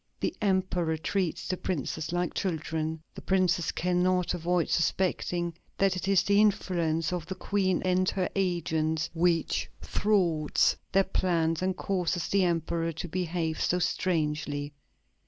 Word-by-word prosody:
The - - -1
Emperor 185 -5 +1
treats 180 +1 -2
the 185 - -1
Princes 160 -2 -3
like 175 -1 -1
children.... 160 -2 -2
The - - -9
Princes 180 -3 +1
cannot 180 0 +1
avoid 175 0 0
suspecting 175 0 0 0.2
that 195 -1 +2
it 185 - -4
is 195 -2 +4
the 200 +1 +4
influence 175 -5 +1
of 175 -2 -3
the 190 - -4
Queen 190 -1 0
and 185 0 +2
her 185 -2 -1
agents 160 -4 0
which 170 -1 +1
thwarts 175 -8 +2 0.2
their 195 +1 +4
plans 170 -4 0
and 185 0 0
causes 180 -3 -1
the 195 -1 +3
Emperor 165 -1 0
to 165 +3 -5
behave 170 -2 -2
so 180 - +2
strangely.... 150 -5 -1
175 Hz, 135 wpm, -28 LUFS, 160-185 Hz, 0.2 s, is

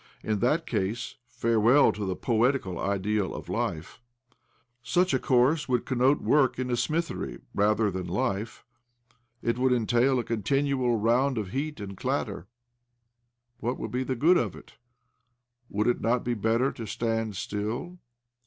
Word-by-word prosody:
In 105 -2 -1
that 150 +9 +1
case 115 +7 -2
farewell 115 +4 +4
to 105 -1 -5
the 95 - -1
poetic 120 +5 +1
ideal 100 +2 -1
of - - -8
life 85 +9 -3 0.3
I - - -34 0.5
Such 175 +8 +1
a 130 - +2
course, 135 +4 +2
would 125 -1 +1
connote 130 +2 +2
work 145 -4 +3
in 125 0 -2
a - - +2
smithery 165 +7 -2 0.2
rather, 105 +1 +2
than 90 -1 -4
life: 110 +2 -2 0.8
it 115 +1 0
would 130 0 +3
entail 120 +2 +2
a 120 - 0
continual 125 +2 0
round 120 +5 +2
of 100 -4 -3
heat 150 +3 -3
and 100 -1 -6
of 95 - -11
clatter. 90 - -2 1.1
What 120 +3 -2
would - - -5
be 125 +1 -1
the 130 0 -2
good 165 +9 +4
of - - -1
it? - - -14 1.0
Would 105 +2 -1
it 120 - +1
not 120 +2 +1
be 120 - -1
better 115 +4 +1
to 115 -3 -8
stand 115 -1 -2
still? 110 - -4
120 Hz, 160 wpm, -27 LUFS, 105-130 Hz, 1.1 s, farewell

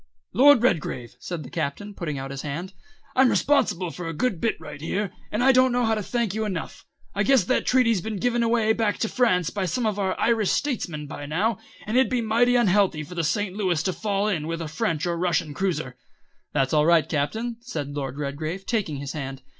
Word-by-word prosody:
"Lord 275 -1 +6
Redgrave," 150 - 0
said 165 +4 -5
the 130 - -10
Captain, 205 +9 -3
putting 155 -7 -4
out 135 0 -5
his 140 -1 -5
hand, 170 +6 -5 0.4
"I'm 260 0 +5
responsible 200 - +2
for 175 0 -6
a 165 - -4
good 190 0 -1
bit 230 - 0
right 145 - -9
here, 195 +5 -2 0.2
and 215 +4 0
I 270 - +7
don't 255 0 +4
know 245 0 +1
how 225 - +2
to 215 - -1
thank 230 -1 -1
you 220 +1 -1
enough. 190 -6 -5 0.3
I 205 - -1
guess 250 +1 +4
that 255 +9 0
treaty's 230 -6 +3
been 220 +1 -4
given 240 +3 +1
away 230 -1 +3
back 220 -2 0
to 225 - 0
France 185 -9 +2
by 195 -2 -2
some 245 +4 -1
of 210 -2 0
our 190 -2 -1
Irish 225 -4 +2
statesmen 175 - -1
by 145 0 -7
now, 195 +8 0 0.3
and 220 +4 0
it'd 260 - +4
be 255 - +1
mighty 235 +2 +3
unhealthy 195 -8 +3
for 155 - -10
the 170 -2 -1
St. 190 +5 -1
Louis 180 -6 0
to 185 - 0
fall 205 0 -1
in 165 -7 -1
with 165 0 -3
a 165 - -4
French 155 +1 -1
or 175 -1 0
Russian 170 -3 0
cruiser 165 -8 -2 0.3
" - - -44
"That's 135 -1 0
all 150 0 +4
right, 170 -2 +4
Captain," 220 +11 -2
said 165 - -5
Lord 135 -2 -4
Redgrave, 155 +6 -4
taking 195 -11 -1
his 140 0 -5
hand. 135 -3 -6
190 Hz, 225 wpm, -25 LUFS, 155-230 Hz, 0.4 s, I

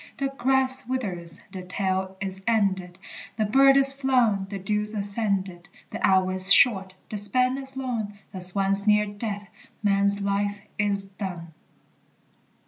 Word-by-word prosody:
The 275 0 -3
grass 265 -1 +2
withers, 185 -10 0
the 185 - -8
tale 190 +1 -4
is 190 0 -6
ended, 190 -5 -1 0.4
The 215 - -1
bird 270 +5 +4
is 275 0 +5
flown, 250 -8 0
the 200 - -6
dew's 210 +2 -4
ascended. 200 -4 -3 0.2
The - - -8
hour 185 -1 +2
is 185 +1 +6
short, 195 -9 +4
the 215 - -6
span 250 +6 +5
is 265 -1 -6
long, 230 -6 -5 0.2
The 185 - -8
swan's 195 +2 +1
near 210 0 +3
death, 205 -1 -7 0.4
man's 200 0 +1
life 200 +1 -3 0.2
is 200 -1 -1
done! 185 -4 -9
200 Hz, 140 wpm, -23 LUFS, 190-235 Hz, 0.4 s, is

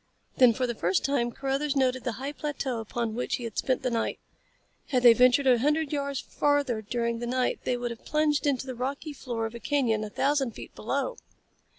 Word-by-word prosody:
Then 250 -3 +7
for 255 +3 -1
the 240 - -2
first 185 -3 0
time 255 -4 +1
Carruthers 275 +3 -1
noted 260 -2 +1
the 245 - -1
high 270 +6 -5
plateau 285 -5 -3
upon 225 0 -3
which 245 - -1
he 245 - -7
had 230 -3 -4
spent 255 -2 0
the 250 - 0
night. 230 -1 -1 0.7
Had 250 -2 +1
they 240 -1 +10
ventured 250 +3 +4
a 250 -2 +5
hundred 300 +3 +1
yards 280 -1 -1
farther 285 -6 0
during 235 +2 -2
the 240 - -4
night 250 +1 0
they 250 - +1
would 240 0 -3
have 230 - -9
plunged 300 0 +1
into 265 -2 0
the 260 - -5
rocky 275 +5 -4
floor 240 -5 -4
of 225 - -5
a 235 - -7
canyon 235 -6 +1
a 215 - -5
thousand 275 +1 0
feet - - -10
below. - - -2
255 Hz, 215 wpm, -28 LUFS, 235-280 Hz, 0.7 s, they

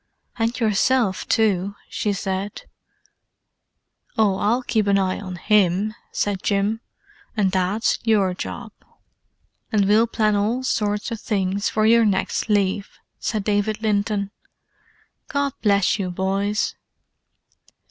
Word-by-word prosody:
"And 230 +2 0
yourself, 220 -1 +1
too," 200 -3 +1
she 210 - -1
said. 195 +1 -3 1.5
"Oh, 205 -3 +3
I'll 235 +5 +1
keep 215 -4 0
an 200 0 +4
eye 185 -1 0
on 185 -3 -6
him," 205 +1 +2 0.2
said 200 -2 -1
Jim. 205 +2 0 0.6
"And 195 -3 +2
Dad's 190 +4 +1
your 205 -5 +2
job." 225 +5 -6 1.0
"And 210 -3 +3
we'll 215 +4 +4
plan 215 -2 +1
all 220 +6 0
sorts 210 -4 -1
of 225 - -4
things 200 -2 0
for 215 0 +1
your 230 +1 +6
next 205 +1 0
leave," 200 -1 0 0.2
said 215 -3 -2
David 210 +1 0
Linton. 205 -1 0 1.0
"God 280 -2 -1
bless 200 -1 +3
you, 185 -2 -1
boys." 195 +3 -1
205 Hz, 120 wpm, -22 LUFS, 195-220 Hz, 1.5 s, your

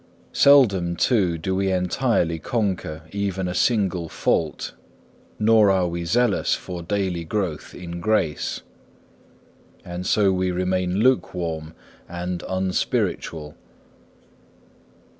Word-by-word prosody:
Seldom, 100 -12 +5
too, 95 -6 +2
do 95 +4 -2
we 95 0 +1
entirely 90 -2 +1
conquer 95 -7 -2
even 100 -2 -2
a 90 - -3
single 90 -5 +1
fault, 80 -2 -1 0.6
nor 110 -1 +5
are 95 -2 +2
we 85 0 -4
zealous 115 +4 +2
for 90 -2 -7
daily 90 -1 -2
growth 90 -2 -3
in 85 -1 -7
grace. 85 -7 0 1.2
And 90 +1 -5
so 100 -3 +3
we 95 0 0
remain 90 0 0
lukewarm 85 -10 0 0.3
and 90 0 -4
unspiritual. 90 -4 -2
90 Hz, 105 wpm, -23 LUFS, 85-100 Hz, 1.2 s, Seldom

